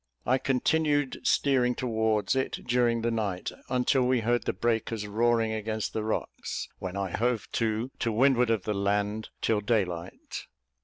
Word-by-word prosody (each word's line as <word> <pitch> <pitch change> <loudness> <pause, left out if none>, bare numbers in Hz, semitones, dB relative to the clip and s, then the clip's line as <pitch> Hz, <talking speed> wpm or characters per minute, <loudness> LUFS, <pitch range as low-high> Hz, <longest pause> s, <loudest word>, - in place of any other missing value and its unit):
I 130 +3 +3
continued 145 +1 +1
steering 125 -3 +3
towards 110 -2 +1
it 130 - -2
during 120 -2 +2
the 120 - +1
night, 100 -5 -2 0.2
until 130 +1 +2
we 125 -1 +2
heard 120 +1 +1
the - - +1
breakers 115 0 -1
roaring 115 +1 +2
against 110 0 -3
the 110 - -1
rocks, 110 - -3
when 95 +1 -4
I 95 -2 -2
hove 120 +1 0
to, 115 +2 -1
to 115 - 0
windward 125 +1 +4
of 110 -5 +1
the 105 - -1
land, 105 +2 -1
till 110 -2 +2
daylight. 95 -6 -2
115 Hz, 155 wpm, -28 LUFS, 105-125 Hz, 0.2 s, windward